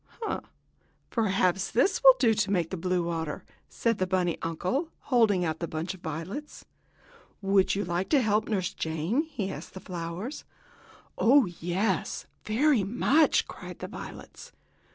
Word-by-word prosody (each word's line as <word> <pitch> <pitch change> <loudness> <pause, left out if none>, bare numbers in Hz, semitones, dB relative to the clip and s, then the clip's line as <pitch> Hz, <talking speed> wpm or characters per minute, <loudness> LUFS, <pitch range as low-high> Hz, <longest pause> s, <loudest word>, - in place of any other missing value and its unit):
"Ha! 440 - -2 0.7
Perhaps 190 -4 +1
these 370 - +2
will 265 -1 +10
do 240 -3 +4
to 210 -2 0
make 175 -5 0
blue 180 -1 0
water," 165 -3 -3 0.3
said 230 -2 0
the 185 - +1
bunny 180 -2 +1
uncle, 185 - -1 0.2
holding 205 -7 +4
out 160 -1 -2
the 170 - -3
bunch 160 +4 -3
of 185 - -14
violets. 180 - -6 0.8
"Would 195 -1 +3
you 200 - -1
like 175 +2 -2
to 290 -4 +4
help 215 0 +1
Nurse 190 -5 -1
Jane?" 160 - -1
he 240 -12 -4
asked - - -9
the - - -6
flowers. 180 - -5 0.8
"Oh, 265 +4 +6
yes, 180 +3 -2 0.2
very 245 +1 +3
much!" 265 +9 +3
cried - - -9
the - - -6
violets. - - -10
190 Hz, 150 wpm, -28 LUFS, 175-230 Hz, 0.8 s, will